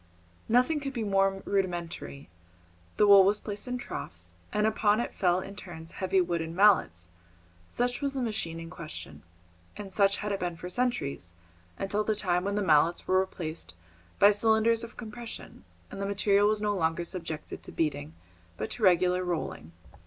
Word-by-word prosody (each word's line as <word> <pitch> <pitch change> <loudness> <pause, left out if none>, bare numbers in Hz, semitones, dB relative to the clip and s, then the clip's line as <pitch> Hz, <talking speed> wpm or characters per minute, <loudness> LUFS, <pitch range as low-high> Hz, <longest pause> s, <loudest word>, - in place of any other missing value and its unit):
Nothing 250 +7 +3
could 275 -1 -5
be 235 -3 -2
more 195 -1 +1
rudimentary. 170 - -3 0.7
The 210 - +5
wool 200 -1 +9
was 205 +2 +3
placed 205 +3 -5
in 250 0 -2
troughs, 85 - -6 0.2
and 210 0 +1
upon 215 0 +2
it 240 - -3
fell 180 -1 +2
in 195 +2 -8
turns 165 -5 -9
heavy 190 0 0
wooden 170 -2 -1
mallets, 130 - +4 0.6
such 245 +2 -1
was 280 -1 -1
the 265 - -1
machine 190 -8 -2
in 165 0 -8
question, 170 -3 -8 0.6
and 195 -2 -8
such 200 -1 +3
it 210 - -2
had 200 - -1
been 175 -1 -2
for 180 - -7
centuries 210 - -2 0.4
until 205 +2 -1
the 215 0 0
time 180 -3 0
when 200 0 -1
the 205 - 0
mallets 165 0 +3
were 185 0 +4
replaced 165 - -5 0.4
by 200 +1 +7
cylinders 220 +2 +2
of 230 - -10
compression, 225 - -8 0.3
and 195 - -6
the 200 - -1
material 200 0 +3
was 215 0 +1
no 205 -1 +1
longer 165 -1 0
subjected 165 -3 -6
to - - -11
beating, 150 0 -2 0.4
but 110 - -4
to - - -6
regular 180 -1 +4
rolling. 155 - -4
195 Hz, 175 wpm, -29 LUFS, 170-210 Hz, 0.7 s, wool